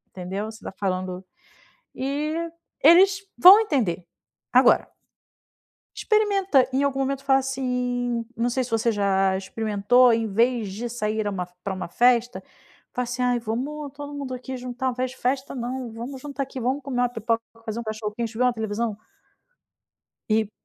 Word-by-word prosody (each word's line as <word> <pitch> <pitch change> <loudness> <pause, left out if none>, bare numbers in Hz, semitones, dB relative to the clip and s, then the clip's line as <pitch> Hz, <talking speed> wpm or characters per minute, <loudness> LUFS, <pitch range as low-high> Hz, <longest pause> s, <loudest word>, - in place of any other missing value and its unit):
Entendeu? 190 +3 -4
Você 220 - -14
tá - - -6
falando 185 -1 -3 0.7
e 285 +3 -2 0.5
eles 380 +6 +6 0.2
vão 380 +4 +10
entender. 235 - 0 0.5
Agora - - +4 1.0
experimenta, 390 - +2
em 265 +2 +1
algum 275 -1 0
momento 275 0 -2
falar 270 -1 +4
assim 250 -2 -2
não 235 +1 +1
sei 255 +2 0
se 250 - -6
você 225 +1 +1
já 195 -2 +2
experimentou, 220 +5 +3
em 225 0 +1
vez 230 -1 +1
de 230 +5 -4
sair 220 -2 -2
a - - 0
uma 180 -3 -3 0.2
pra 195 -1 -2
um 185 -2 -5
festa, 245 +4 +2 0.5
falar 250 - -1
assim: 250 +1 -3
"Ai, 245 -1 +2
vamos 270 +6 -4
todo 290 +1 -8
mundo 280 -2 -5
aqui 255 +1 -6
juntar 250 0 -3
fe 255 +1 -1
festa, 260 +2 -2
não. 250 -1 -4
Vamos 240 +4 -7
juntar 280 -1 -4
aqui, 265 -1 -8
vamos 260 +4 -1
comer 260 -3 -2
uma 245 - +2
pipoca, 230 -1 -1 0.2
fazer 220 +1 -4
um - - -5
cachorro-quente 220 +1 -4
e - - -6
ver 250 - +3
uma 250 - +4
televisão". 220 -1 -2 1.3
E 215 -1 +2
245 Hz, 165 wpm, -24 LUFS, 220-265 Hz, 1.3 s, vão